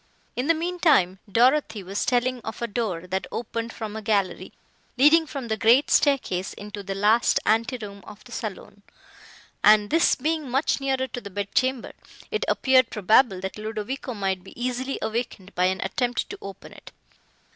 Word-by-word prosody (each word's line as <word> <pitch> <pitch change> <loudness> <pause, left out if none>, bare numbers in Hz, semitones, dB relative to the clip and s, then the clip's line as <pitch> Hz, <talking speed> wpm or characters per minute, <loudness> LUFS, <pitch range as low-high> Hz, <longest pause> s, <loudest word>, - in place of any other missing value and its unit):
In 250 +3 -2
the 330 - +4
mean 350 +3 -3
time, 190 - +3
Dorothée 245 -2 +3
was 195 +2 -3
telling 250 0 +1
of 220 0 -7
a - - +2
door, 205 -6 -3
that 190 +1 -3
opened 230 0 -4
from 215 -2 -6
a 220 - -5
gallery, 205 -3 -1 0.5
leading 310 +5 +5
from 275 -5 -6
the 220 - 0
great 235 +6 +4
staircase 225 -10 +1
into 205 0 -8
the 195 0 -5
last 215 +4 +3
ante 230 +3 +1
room 200 -3 -9
of 210 0 -12
the 250 - -16
saloon, 205 -3 -7 0.8
and, 210 -1 +5
this 330 +1 +4
being 310 -2 -2
much 270 +2 +1
nearer 265 -1 0
to 250 -1 -7
the 200 - -8
bed 200 +1 -5
chamber, 260 -2 0 0.4
it 435 +1 -1
appeared 260 -2 +3
probable, 210 0 +3
that 190 +2 -5
Ludovico 220 +4 -5
might 190 -2 -2
be 190 - -14
easily 255 +2 -2
awakened 220 -3 -4
by 180 - +2
an 185 +1 0
attempt 245 +5 -1
to - - -6
open 195 -1 -10
it. - - -14
230 Hz, 180 wpm, -25 LUFS, 200-260 Hz, 0.8 s, leading